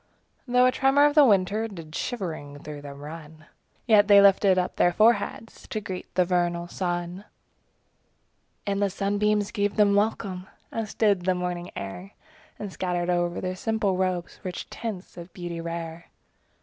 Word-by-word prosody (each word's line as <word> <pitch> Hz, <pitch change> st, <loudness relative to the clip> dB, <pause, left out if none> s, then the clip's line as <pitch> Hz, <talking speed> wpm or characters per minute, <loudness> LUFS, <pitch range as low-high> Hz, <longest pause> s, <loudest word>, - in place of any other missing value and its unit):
5 245 Hz, -, -6 dB
Though 250 Hz, 0 st, +6 dB
a 255 Hz, -, +5 dB
tremor 270 Hz, +3 st, +4 dB
of 295 Hz, -, +3 dB
the 300 Hz, -1 st, +7 dB
winter 210 Hz, -1 st, +3 dB
Did 165 Hz, -7 st, -10 dB
shivering 160 Hz, -, -5 dB
through 150 Hz, -1 st, -7 dB
them 140 Hz, 0 st, -10 dB
run; 155 Hz, 0 st, -10 dB, 0.4 s
Yet 210 Hz, -3 st, +5 dB
they 200 Hz, -1 st, +8 dB
lifted 195 Hz, -1 st, +5 dB
up 180 Hz, -, -1 dB
their 175 Hz, -, +4 dB
foreheads 225 Hz, +2 st, +1 dB
To 215 Hz, -, -3 dB
greet 190 Hz, -3 st, -7 dB
the 180 Hz, -, +4 dB
vernal 175 Hz, -1 st, 0 dB
sun. 175 Hz, +1 st, -3 dB, 1.4 s
And 200 Hz, 0 st, -1 dB
the 200 Hz, -, +2 dB
sunbeams 205 Hz, +1 st, 0 dB
gave 205 Hz, -2 st, -1 dB
them 205 Hz, -2 st, +4 dB
welcome. 200 Hz, -3 st, -1 dB, 0.2 s
As 225 Hz, -2 st, -4 dB
did 200 Hz, -5 st, +2 dB
the 185 Hz, -1 st, +2 dB
morning 180 Hz, 0 st, -3 dB
air 180 Hz, -, -7 dB, 0.4 s
And 205 Hz, -2 st, -6 dB
scattered 180 Hz, -1 st, -1 dB
o'er 175 Hz, 0 st, 0 dB
their 185 Hz, 0 st, -3 dB
simple 210 Hz, -1 st, 0 dB
robes 185 Hz, -2 st, -2 dB
Rich 180 Hz, -2 st, -6 dB
tints 210 Hz, -7 st, -6 dB
of 170 Hz, +1 st, -9 dB
beauty 175 Hz, -2 st, -5 dB
rare. 165 Hz, 0 st, -6 dB
185 Hz, 160 wpm, -26 LUFS, 175-210 Hz, 1.4 s, they